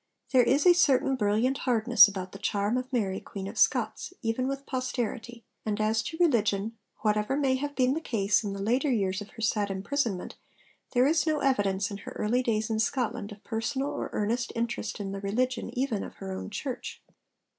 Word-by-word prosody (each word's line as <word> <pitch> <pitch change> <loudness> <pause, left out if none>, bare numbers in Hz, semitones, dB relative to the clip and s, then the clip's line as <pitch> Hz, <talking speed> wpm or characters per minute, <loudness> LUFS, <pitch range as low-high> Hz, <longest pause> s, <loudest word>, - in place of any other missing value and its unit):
There 260 -2 +6
is 270 +4 +3
a 355 - +9
certain 270 -5 +3
brilliant 235 +4 +1
hardness 240 -1 +6
about 190 -2 -5
the 195 - -10
charm 205 +2 0
of 255 +1 -3
Mary 200 -7 0
Queen 195 -1 -7
of 205 - -7
Scots, 295 - +1
even 225 +3 0
with 275 0 -4
posterity; 240 -2 -3 0.2
and 215 0 -2
as 215 +1 +2
to 320 - -6
religion, 225 - +2 0.3
whatever 210 +4 +1
may 275 -3 +2
have 285 +1 -4
been 255 0 +3
the 320 - -2
case 210 -7 +1
in 200 -2 -3
the 195 0 -4
later 255 +7 +1
years 195 -4 0
of 205 - -8
her 225 - -8
sad 210 -2 +1
imprisonment, 195 0 -2 0.6
there 250 0 +4
is 315 +3 +2
no 310 -1 +1
evidence 200 -7 +1
in 200 - -4
her - - -9
early 240 +4 +1
days 220 -3 0
in 220 -1 -1
Scotland 225 -2 -1
of 205 0 -12
personal 265 +5 -2
or - - -4
earnest 235 +4 -1
interest 230 -2 -2
in 195 -1 -4
the 195 0 -5
religion 245 +6 -1
even 245 -6 0
of - - -9
her 195 -1 -7
own 190 - -5
church. 245 +5 -5
225 Hz, 200 wpm, -28 LUFS, 205-260 Hz, 0.6 s, a